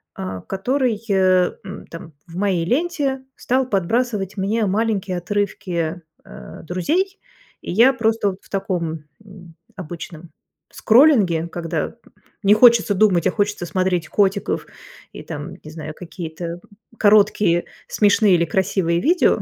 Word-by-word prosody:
а, 95 0 -6
который, 235 - -1
э, 185 -2 +3
м, 195 0 -9
там 165 -1 -10
в 165 - -12
моей 185 -4 0
ленте 275 - -1
стал 255 +1 0
подбрасывать 210 0 -1
мне 210 +3 0
маленькие 200 -2 -1
отрывки, 175 -3 -2 0.2
э, - - -11
"Друзей", 315 - -1 0.4
и - - -6
я 240 +8 +5
просто 220 -4 0
в - - -23
таком, 170 -6 -3 0.2
м, 180 -5 -15 0.2
обычном 170 -1 -8 0.4
скроллинге, 215 - +4
когда 165 0 -4 0.5
не 200 - +6
хочется 220 -2 +5
думать, 185 -4 +3
а - - +2
хочется 205 -4 -1
смотреть 180 -2 -1
котиков 200 -1 0 0.5
и - - -8
там, 150 0 -7
не 155 - -10
знаю, 155 -1 -7
какие-то 170 -1 -7 0.4
короткие 205 -4 +3 0.2
смешные 205 -2 +3
или 170 0 +2
красивые 175 -1 0
видео. 350 - +3
190 Hz, 125 wpm, -20 LUFS, 170-220 Hz, 0.5 s, не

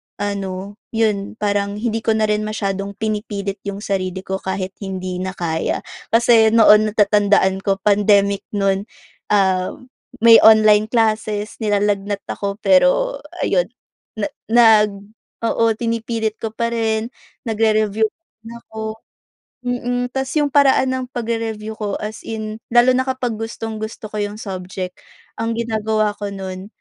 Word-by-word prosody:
ano, 200 0 -4 0.2
yun, 215 -2 0
parang 205 -1 -1
hindi 225 +1 -2
ko 225 0 +1
na 220 - +1
rin 210 0 +1
masyadong 200 -2 -3
pinipilit 205 -2 -3
yung 200 +1 -5
sarili 190 -2 -2
ko 190 0 -3
kahit 190 0 -3
hindi 185 -2 -4
na 190 0 -4
kaya. 165 -2 -2 0.2
Kasi 230 -1 +5
noon 215 -1 +7
natatandaan 205 -2 +3
ko 195 0 0
pandemic 200 -1 +3
no'n, 195 +1 0 0.4
ah, 190 -3 +2 0.5
may 230 -1 +9
online 215 -1 +6
classes, 215 -2 0
nilalagnat 205 -2 0
ako 200 -1 -3
pero 290 - +3 0.2
ayun - - +2 0.5
na 215 -2 -1 0.2
nag 220 -3 +6 0.5
oo, 230 0 +1
pinipilit 230 -1 -2
ko 225 - -3
pa 235 +1 -1
rin, 225 0 -1 0.3
nagre-review 220 -1 +1
pa - - -23 0.2
rin 225 +1 -12
ako 220 0 -9 0.8
mm. 245 0 -2
Ta's 265 0 -3
yung 295 -2 +2
paraan 270 -2 +4
ng 260 0 -2
pagre-review 225 -2 -3
ko 205 -2 -2
as 215 +1 -5
in 215 -1 -5
lalo 240 +2 +5
na 260 +1 +1
kapag 250 -4 -2
gustong-gusto 220 -1 -6
ko 215 - -4
yung 205 0 -3
subject. 185 -3 -6 0.4
Ang 225 0 -1
ginagawa 220 -2 0
ko 205 - -3
no'n, 190 -1 -6
215 Hz, 135 wpm, -19 LUFS, 200-225 Hz, 0.8 s, may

